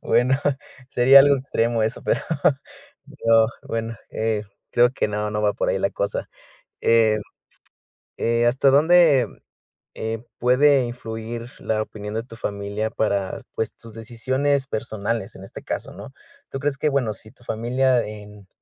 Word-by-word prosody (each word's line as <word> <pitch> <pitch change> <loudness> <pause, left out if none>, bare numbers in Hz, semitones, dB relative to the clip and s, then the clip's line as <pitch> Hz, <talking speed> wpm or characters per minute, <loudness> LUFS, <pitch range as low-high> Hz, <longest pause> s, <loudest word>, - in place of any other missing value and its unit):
Bueno, 130 +2 +3 0.5
sería 130 +2 +7
algo 140 0 +5
extremo 120 -3 0
eso, 110 +2 -2
pero - - +1 0.9
yo, 115 -6 +3 0.2
bueno, 115 0 -4
eh, 110 -1 -1 0.3
creo 120 0 +5
que - - 0
no 105 0 -2
no 105 0 -2
va 105 - +3
por - - -1
ahí - - +1
la - - 0
cosa. - - -3 0.5
Eh, 110 -2 +4 1.0
eh, 115 0 +1
¿hasta 130 +3 +3
dónde, 150 -3 +5 0.7
eh, 110 +1 -4
puede 130 +2 +4
influir 115 0 -6
la 110 -1 -1
opinión 105 -1 -7
de 115 - -1
tu 120 - -13
familia 100 0 -3
para, 100 -3 -1
pues, 110 - -2
tus 115 -2 -13
decisiones 130 +5 -1
personales 110 -3 -3
en 95 - -11
este - - -10
caso?, - - -5
¿no? - - -10 0.4
¿Tú 135 - -4
crees 145 -1 -1
que?, 150 - +1
bueno, 130 -6 0
si 110 - -11
tu 120 - -23
familia 125 +2 +1
en 105 -2 -11
115 Hz, 150 wpm, -23 LUFS, 110-130 Hz, 1.0 s, sería